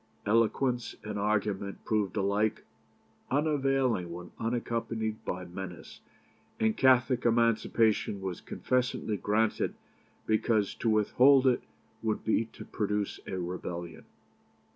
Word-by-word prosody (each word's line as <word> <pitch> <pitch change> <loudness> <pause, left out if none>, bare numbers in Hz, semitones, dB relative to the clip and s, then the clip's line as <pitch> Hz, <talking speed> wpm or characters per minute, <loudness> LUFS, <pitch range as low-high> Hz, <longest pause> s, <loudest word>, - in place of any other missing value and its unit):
Eloquence 115 +3 +1
and 105 -1 -4
argument 100 -1 -1
proved 105 -3 0
alike 100 +2 +1 0.7
unavailing 135 - +1
when 90 +1 -8
unaccompanied 115 -1 -2
by 90 0 -3
menace, 90 -1 -8 0.6
and 110 -1 +2
Catholic 130 -1 +4
Emancipation 115 -3 +2
was 95 -2 -5
confessedly 125 -4 -1
granted 105 +3 0 0.5
because 110 -1 +1
to 115 - -1
withhold 130 +6 +5
it 125 -2 +3 0.4
would 110 -1 -1
be 110 +1 +2
to 115 - -12
produce 105 -1 -2
a 95 - -3
rebellion." 85 -1 -5
110 Hz, 105 wpm, -30 LUFS, 100-120 Hz, 0.7 s, withhold